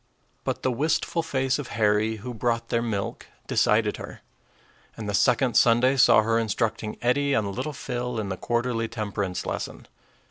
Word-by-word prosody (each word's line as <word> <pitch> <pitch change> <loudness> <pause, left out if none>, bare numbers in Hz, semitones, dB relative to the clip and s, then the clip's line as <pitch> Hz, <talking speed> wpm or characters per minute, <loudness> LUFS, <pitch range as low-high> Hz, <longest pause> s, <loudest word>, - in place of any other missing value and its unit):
But - - -3
the 130 - +2
wistful 155 +5 0
face 135 -4 0
of 140 - -5
Harry, 110 +1 +2
who 120 +3 -7
brought 115 0 -1
their 115 - +1
milk, 110 -4 -3 0.2
decided - - +2
her; - - -9 0.8
and 110 -2 -5
the 105 - -2
second 125 +3 +3
Sunday 120 +3 +5
saw 120 -4 +6
her 115 +1 +2
instructing 110 0 -2
Eddie 140 +3 +2
and 100 -5 0
little 135 +5 -3
Phil 125 -3 -4
in 105 -2 -3
the 95 - -2
quarterly 120 +2 -1
temperance 100 -4 -3
lesson. - - -5
115 Hz, 165 wpm, -25 LUFS, 110-125 Hz, 0.8 s, saw